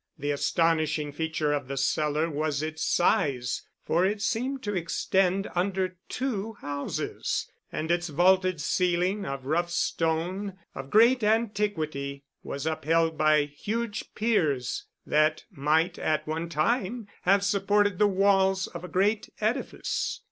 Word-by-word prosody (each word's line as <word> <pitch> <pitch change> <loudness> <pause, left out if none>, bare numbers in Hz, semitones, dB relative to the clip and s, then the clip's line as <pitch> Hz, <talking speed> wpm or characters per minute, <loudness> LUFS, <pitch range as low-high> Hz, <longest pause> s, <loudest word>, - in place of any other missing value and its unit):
The 145 +1 -2
astonishing 155 0 +1
feature 155 0 -1
of 145 -3 -2
the 135 +1 -4
cellar 150 +3 +1
was 150 -1 -1
its 155 0 -3
size, 130 -7 +1 0.2
for 170 +2 +2
it 205 +2 +1
seemed 255 +5 -1
to 205 - -2
extend 190 +2 +1
under 185 0 -1
two 225 -5 -2
houses, 145 -7 -3 0.2
and 160 +2 -2
its 175 0 +1
vaulted 185 +2 +3
ceiling 180 +5 0
of 135 -1 -5
rough 170 +5 0
stone 175 +4 -1 0.2
of 135 0 -7
great 235 - +5
antiquity 200 -11 0 0.2
was 140 +2 -5
upheld 160 +1 +1
by 155 -1 +4
huge 215 +9 -4
piers, 155 - 0 0.2
that 155 +1 +2
might 160 +3 +1
at 155 -1 0
one 160 +2 -3
time 205 - 0
have 195 +2 +3
supported 205 -1 +2
the 210 - +6
walls 195 -1 +3
of 175 -1 -8
a - - -5
great 205 +3 +1
edifice. 220 +5 -2
175 Hz, 135 wpm, -27 LUFS, 155-200 Hz, 0.2 s, the